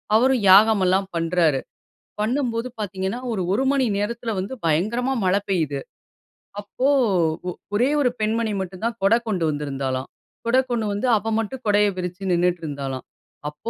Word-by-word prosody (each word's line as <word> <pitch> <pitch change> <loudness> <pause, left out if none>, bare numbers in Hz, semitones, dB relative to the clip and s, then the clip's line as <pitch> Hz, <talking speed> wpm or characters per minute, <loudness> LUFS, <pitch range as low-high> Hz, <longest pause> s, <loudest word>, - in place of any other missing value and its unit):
அவரும் 255 +2 +4
யாகம் 205 +2 +7
எல்லாம் 190 +1 +2
பண்றாரு. 165 -4 +2 0.6
பண்ணும்போது 235 0 -1
பாத்தீங்கன்னா 190 +2 -3
ஒரு 210 -4 -1
1 245 +6 +1
மணி 275 -2 +2
நேரத்துல 230 +2 -2
வந்து 195 +7 -4
பயங்கரமா 215 +12 +1
மழை 185 +2 +3
பெய்யுது. 155 -7 0 0.8
அப்போ 230 +6 -2 0.9
ஒரே 245 +6 +3
ஒரு 255 - +3
பெண்மணி 220 +1 0
மட்டும் 185 +1 -7
தான் 230 -1 -2
கொடை 200 +4 +5
கொண்டு 185 -6 0
வந்திருந்தாளாம். 135 -3 -3 0.4
கொடை 255 +3 +4
கொண்டு 230 -2 0
வந்து 205 +5 -1
அவ 220 +2 -3
மட்டும் 250 +4 -4
கொடையை 205 0 +4
விரிச்சு 185 +1 -4
நின்னுட்டு 175 0 +1
இருந்தாளாம். 135 -3 -5 0.4
அப்போ 150 +9 -7
200 Hz, 145 wpm, -23 LUFS, 175-230 Hz, 0.9 s, யாகம்